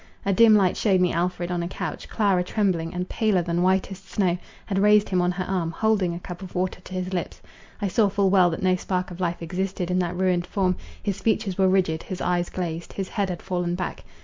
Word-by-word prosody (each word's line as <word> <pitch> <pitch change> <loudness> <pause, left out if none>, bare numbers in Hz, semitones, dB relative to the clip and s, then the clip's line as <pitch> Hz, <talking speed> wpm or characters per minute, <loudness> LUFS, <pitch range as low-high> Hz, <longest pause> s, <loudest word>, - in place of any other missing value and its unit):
A 200 - +2
dim 220 +1 +7
light 190 -3 +3
shewed 195 -4 +3
me 180 -1 +2
Alfred 175 0 -1
on 175 -1 -1
a 170 - -2
couch; - - -5
Clara 200 -5 +2
trembling, 180 -4 0
and 180 0 -3
paler 210 -6 +1
than 170 0 -1
whitest 190 +1 0
snow, 185 -4 +1 0.3
had 195 -2 -1
raised 210 +1 +5
him 185 -2 +2
on 180 0 +2
her 185 +1 -2
arm, 180 -3 -1
holding 195 -2 +1
a - - -5
cup 180 +1 -8
of 190 - -9
water 180 0 -1
to 185 - -11
his 185 0 -3
lips. 175 - -3 0.4
I - - +2
saw 205 +2 +3
full 195 -1 +2
well 185 -3 +5
that 165 +2 -4
no 185 -1 +4
spark 180 0 -2
of 175 - -9
life 175 -2 -2
existed 180 +1 -2
in 180 - +2
that 175 0 -1
ruined 180 -2 +1
form, 185 -2 +1 0.3
his 200 -3 -2
features 200 -4 0
were 190 -1 +5
rigid, 180 -4 +2
his 185 -2 -6
eyes 175 -1 0
glazed, 170 -2 -4
his 195 -1 -4
head 200 -3 -1
had 175 -2 -5
fallen 175 -2 -1
back. 180 -1 -4
185 Hz, 235 wpm, -25 LUFS, 175-195 Hz, 0.4 s, dim